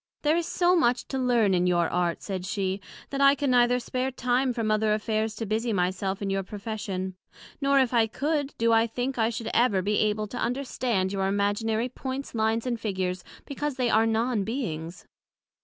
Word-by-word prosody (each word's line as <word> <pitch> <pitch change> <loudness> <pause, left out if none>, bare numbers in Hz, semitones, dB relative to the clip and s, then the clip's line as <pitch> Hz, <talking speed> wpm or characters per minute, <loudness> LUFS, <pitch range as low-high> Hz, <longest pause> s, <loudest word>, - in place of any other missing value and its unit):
There 300 +1 +3
is 340 -1 -1
so 355 0 +3
much 250 -8 +2
to 265 - -2
learn 240 -6 +3
in 180 0 +2
your 175 -2 +2
Art, 175 -1 -1
said 190 -3 -4
she, 195 -1 -2 0.3
that 275 0 -2
I 275 0 +7
can 280 -1 0
neither 245 0 +4
spare 255 +2 -2
time 250 0 0
from 230 -3 -1
other 215 0 +2
affairs 215 0 -1
to 225 - -4
busie 220 +2 -1
my 180 -1 +2
self 195 +1 -3
in 195 - -1
your 195 0 0
profession; 195 -2 -5 0.5
nor, 275 0 +4
if 255 -2 +2
I 230 -2 +4
could, 290 +4 -2
do 230 0 +3
I 225 +1 +4
think 245 +3 -3
I 225 0 +3
should 230 -1 -4
ever 210 -6 +3
be 205 +2 +1
able 215 0 +1
to 245 - -5
understand 240 -6 -1
your 195 -1 0
Imaginary 205 +4 0
points, 260 +2 -6
lines 225 +1 0
and 240 -2 -2
figures, 185 -4 -2 0.2
because 290 0 -3
they 250 -3 0
are 225 +1 +4
Non 225 -1 +1
beings. 180 - -4
225 Hz, 200 wpm, -27 LUFS, 200-250 Hz, 0.5 s, I